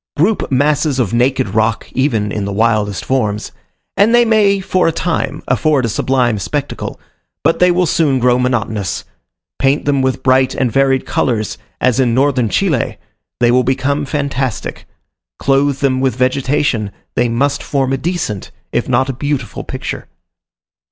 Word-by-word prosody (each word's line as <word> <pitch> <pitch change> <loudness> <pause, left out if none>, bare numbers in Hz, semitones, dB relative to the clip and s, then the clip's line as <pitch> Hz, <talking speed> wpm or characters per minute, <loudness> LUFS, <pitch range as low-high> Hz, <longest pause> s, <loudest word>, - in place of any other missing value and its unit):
Group 190 +4 +1
masses 145 +1 +2
of 120 -6 0
naked 125 -2 +1
rock, 110 +2 0
even 115 -6 0
in 105 - -2
the 100 - -3
wildest 105 -2 0
forms, 110 -6 -1 0.4
and 220 +4 +4
they 240 0 +5
may 210 -3 +3
for 185 -2 +1
a - - +3
time 165 +1 -2
afford 150 -5 +2
a - - -1
sublime 120 -1 +1
spectacle, 145 +8 -4 0.4
but 165 +3 +2
they 180 - +5
will 180 +1 +2
soon 150 -4 +2
grow 125 0 +3
monotonous. 110 -6 -1 0.6
Paint 135 +2 +1
them 140 -1 +2
with 130 0 -1
bright 130 0 +3
and 130 -3 0
varied 135 0 +2
colours, 110 -4 -1 0.2
as 130 0 +2
in 120 -3 +2
Northern 130 -4 +2
Chile, 160 - 0 0.4
they 120 -1 +4
will 125 +1 +3
become 135 +3 0
fantastic; 135 -3 -3 0.5
clothe 140 0 +1
them 130 -2 +2
with 130 -4 +1
vegetation, 130 -3 0 0.3
they 120 0 +2
must 140 +5 0
form 135 -2 -1
a - - +1
decent, 145 - -3 0.2
if - - -1
not 130 +1 +2
a 135 - -2
beautiful 140 -2 -3
picture. - - -6
130 Hz, 160 wpm, -16 LUFS, 120-145 Hz, 0.6 s, they